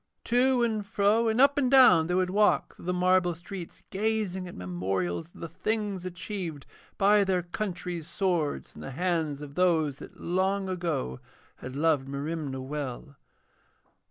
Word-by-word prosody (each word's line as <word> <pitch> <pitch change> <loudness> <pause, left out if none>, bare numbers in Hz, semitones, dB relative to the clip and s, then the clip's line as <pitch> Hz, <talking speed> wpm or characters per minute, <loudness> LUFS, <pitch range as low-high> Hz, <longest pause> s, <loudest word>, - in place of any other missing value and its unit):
To 250 +1 +3
and 220 -3 0
fro 205 +3 +2
and 220 +2 +1
up 280 +2 +5
and 260 -3 +2
down 245 -12 +7
they 180 - 0
would 185 0 +1
walk 210 +2 +2
through - - -13
the 180 - 0
marble 180 -1 +3
streets, 180 +1 -9
gazing 200 -3 -1
at 175 - -9
memorials 90 - -2
of 175 - -16
the 165 - -4
things 205 -1 -2
achieved 175 -5 -5 0.3
by 205 +1 +5
their 185 -2 0
country's 175 -3 -4
swords 175 -7 -1
in - - -11
the - - -6
hands 165 -5 -1
of 140 -1 -9
those 160 -5 +2
that - - -12
long 190 +2 0
ago 165 - -2 0.4
had 130 +1 -8
loved 150 -3 +2
Merimna 140 -1 -4
well. 140 0 -5
180 Hz, 155 wpm, -28 LUFS, 150-200 Hz, 0.4 s, down